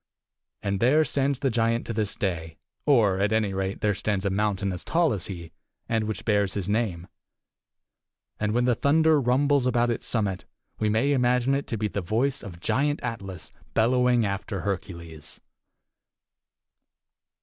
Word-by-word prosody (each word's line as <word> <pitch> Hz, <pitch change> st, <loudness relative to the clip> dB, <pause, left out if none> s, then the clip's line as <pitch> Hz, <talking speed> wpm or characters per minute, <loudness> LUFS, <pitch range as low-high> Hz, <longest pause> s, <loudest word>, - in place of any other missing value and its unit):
And 100 Hz, -1 st, -1 dB
there 145 Hz, +8 st, +4 dB
stands 140 Hz, 0 st, 0 dB
the 135 Hz, -1 st, 0 dB
giant 115 Hz, 0 st, +1 dB
to 115 Hz, -, -4 dB
this 105 Hz, -2 st, -2 dB
day, 80 Hz, -4 st, -3 dB, 0.3 s
or, 110 Hz, -9 st, +4 dB
at 100 Hz, +2 st, +1 dB
any 110 Hz, -3 st, +1 dB
rate, 95 Hz, 0 st, -3 dB
there 105 Hz, -1 st, +2 dB
stands 100 Hz, 0 st, -2 dB
a 100 Hz, -, +1 dB
mountain 100 Hz, -1 st, 0 dB
as 90 Hz, -, -6 dB
tall 165 Hz, -4 st, +2 dB
as 95 Hz, -5 st, -3 dB
he, 85 Hz, -4 st, -7 dB, 0.4 s
and 110 Hz, -1 st, 0 dB
which 110 Hz, 0 st, -4 dB
bears 100 Hz, -3 st, +1 dB
his 100 Hz, -3 st, -2 dB
name; 100 Hz, -5 st, -1 dB, 1.3 s
and 105 Hz, 0 st, 0 dB
when 120 Hz, +2 st, +2 dB
the 125 Hz, -, +3 dB
thunder 155 Hz, +4 st, +3 dB
rumbles 135 Hz, +1 st, +2 dB
about 120 Hz, -1 st, +2 dB
its 115 Hz, -, -4 dB
summit 100 Hz, -5 st, -1 dB, 0.3 s
we 110 Hz, -, +1 dB
may 115 Hz, +7 st, +2 dB
imagine 125 Hz, 0 st, +2 dB
it 140 Hz, +1 st, -1 dB
to 115 Hz, -, -3 dB
be 105 Hz, 0 st, -1 dB
the 100 Hz, -, -3 dB
voice 120 Hz, +9 st, 0 dB
of 90 Hz, -6 st, -9 dB
Giant 145 Hz, -, 0 dB
Atlas 95 Hz, -7 st, -6 dB, 0.2 s
bellowing 125 Hz, 0 st, +3 dB
after 100 Hz, -1 st, -3 dB
Hercules. 85 Hz, -5 st, -5 dB
110 Hz, 160 wpm, -26 LUFS, 95-125 Hz, 1.3 s, there